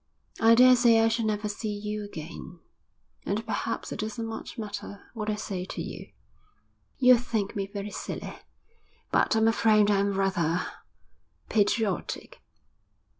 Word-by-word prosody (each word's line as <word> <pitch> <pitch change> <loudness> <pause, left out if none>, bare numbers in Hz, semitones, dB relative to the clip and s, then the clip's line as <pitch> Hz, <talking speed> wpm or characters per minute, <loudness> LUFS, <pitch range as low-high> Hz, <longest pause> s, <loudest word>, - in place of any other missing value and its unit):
'I 225 +1 +6
daresay 245 -2 +6
I 225 0 +4
shall 225 0 0
never 210 0 -1
see 210 +1 -4
you 210 0 -4
again, 175 -2 -8 0.7
and 215 +3 -2
perhaps 230 0 -3
it - - -5
doesn't 220 +2 -3
much 225 0 -7
matter 205 -2 -6
what 215 -2 -4
I 210 - 0
say 195 -3 -4
to - - -7
you. - - -8 0.9
You'll 250 -2 +6
think 225 -4 -2
me 195 -1 -2
very 200 +1 -6
silly, - - -6 0.7
but - - +3
I'm 220 0 +4
afraid 215 -2 +4
I'm 200 -1 +1
rather 175 -3 +1 0.8
patriotic. 210 -2 0
210 Hz, 135 wpm, -27 LUFS, 200-225 Hz, 0.9 s, I